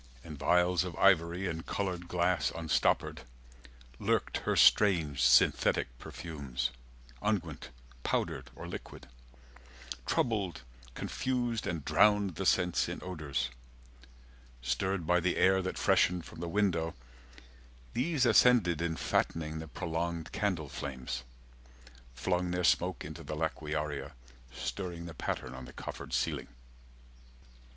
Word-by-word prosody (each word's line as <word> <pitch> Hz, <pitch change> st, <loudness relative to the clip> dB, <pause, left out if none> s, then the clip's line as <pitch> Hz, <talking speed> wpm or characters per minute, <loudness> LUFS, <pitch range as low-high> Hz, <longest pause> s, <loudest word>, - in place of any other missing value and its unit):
In 80 Hz, -2 st, -8 dB
vials 90 Hz, +4 st, +3 dB
of 90 Hz, -3 st, -5 dB
ivory 90 Hz, -1 st, +3 dB
and 80 Hz, -1 st, -3 dB
coloured 90 Hz, -3 st, -3 dB
glass 90 Hz, 0 st, +1 dB
Unstoppered, 80 Hz, -1 st, +1 dB, 0.8 s
lurked -, -, +1 dB
her -, -, -1 dB
strange 85 Hz, -9 st, +5 dB
synthetic -, -, +4 dB
perfumes, 65 Hz, -6 st, -4 dB, 0.5 s
Unguent, 90 Hz, -8 st, -2 dB, 0.3 s
powdered, -, -, -1 dB
or -, -, -8 dB
liquid—troubled, 60 Hz, -, -5 dB, 0.3 s
confused 120 Hz, -3 st, -1 dB
And 85 Hz, -4 st, -3 dB
drowned 100 Hz, +4 st, +4 dB
the 95 Hz, +4 st, -2 dB
sense 90 Hz, -2 st, +2 dB
in -, -, -4 dB
odours; 75 Hz, -8 st, -3 dB, 1.1 s
stirred 85 Hz, +9 st, -1 dB
by 90 Hz, +2 st, +4 dB
the 90 Hz, +1 st, 0 dB
air 95 Hz, 0 st, +4 dB
That 95 Hz, -, -3 dB
freshened 90 Hz, -2 st, +3 dB
from -, -, -11 dB
the 85 Hz, 0 st, -4 dB
window, 85 Hz, -4 st, +1 dB, 1.0 s
these 135 Hz, +1 st, +1 dB
ascended 110 Hz, -7 st, +5 dB
90 85 Hz, -, 0 dB
In 80 Hz, -1 st, -1 dB
fattening 80 Hz, -1 st, -1 dB
the 80 Hz, -, -7 dB
prolonged 85 Hz, +1 st, -3 dB
candle 95 Hz, -8 st, -1 dB
flames, 65 Hz, -3 st, -5 dB, 0.9 s
Flung 90 Hz, +5 st, 0 dB
their 90 Hz, 0 st, -1 dB
smoke 90 Hz, -1 st, +2 dB
into 80 Hz, +2 st, -8 dB
the 75 Hz, -, -5 dB
laquearia, 75 Hz, -2 st, -3 dB, 0.4 s
Stirring 85 Hz, +9 st, -5 dB
the 85 Hz, -, -7 dB
pattern 65 Hz, -3 st, -4 dB
on 65 Hz, -1 st, -8 dB
the -, -, -12 dB
coffered -, -, -7 dB
ceiling. -, -, -1 dB
85 Hz, 120 wpm, -32 LUFS, 75-90 Hz, 1.1 s, strange